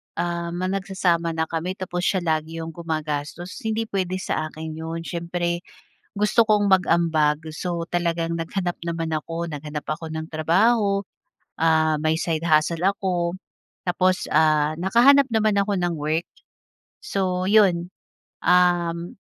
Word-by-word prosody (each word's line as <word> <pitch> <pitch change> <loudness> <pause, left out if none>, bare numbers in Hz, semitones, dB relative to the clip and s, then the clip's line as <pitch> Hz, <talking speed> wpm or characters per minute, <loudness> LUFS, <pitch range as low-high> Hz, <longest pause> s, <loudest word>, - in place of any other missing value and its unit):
ah, 170 0 -2
ma 185 +1 -1
nagsasama 185 -4 0
na 160 - +1
kami 165 +3 -3
tapos 180 -1 -3
siya 185 -3 +1
lagi 160 -1 -1
iyong 165 0 -5
gumagastos 160 +1 -4
hindi 220 -2 -1
pwede 185 -2 -1
sa 155 -4 -2
akin 160 0 -7
iyon. 165 +1 -5
Siyempre, 170 0 -2 0.5
gusto 210 +3 +3
kong 210 -2 +3
mag-ambag 165 -5 +3
so 170 +1 -4
talagang 170 -1 -1
naghanap 175 +2 -2
naman 165 -1 -2
ako, 165 +2 -3
naghanap 150 0 -6
ako 160 +2 -3
ng 160 0 -5
trabaho. 200 +6 +2 0.6
Ah, 160 -1 +3
may 155 +1 +1
side 165 -1 -1
hustle 160 +2 +2
ako, 180 -3 0 0.5
tapos 185 +1 +1
ah, 155 0 +3
nakahanap 240 +10 +5
naman 215 -2 +2
ako 200 +1 +1
ng 175 -2 0
work. 155 +3 -1 0.7
So 185 -2 -1
iyon, 185 -5 +4 0.5
um, 175 -1 +2
170 Hz, 135 wpm, -23 LUFS, 160-185 Hz, 0.7 s, nakahanap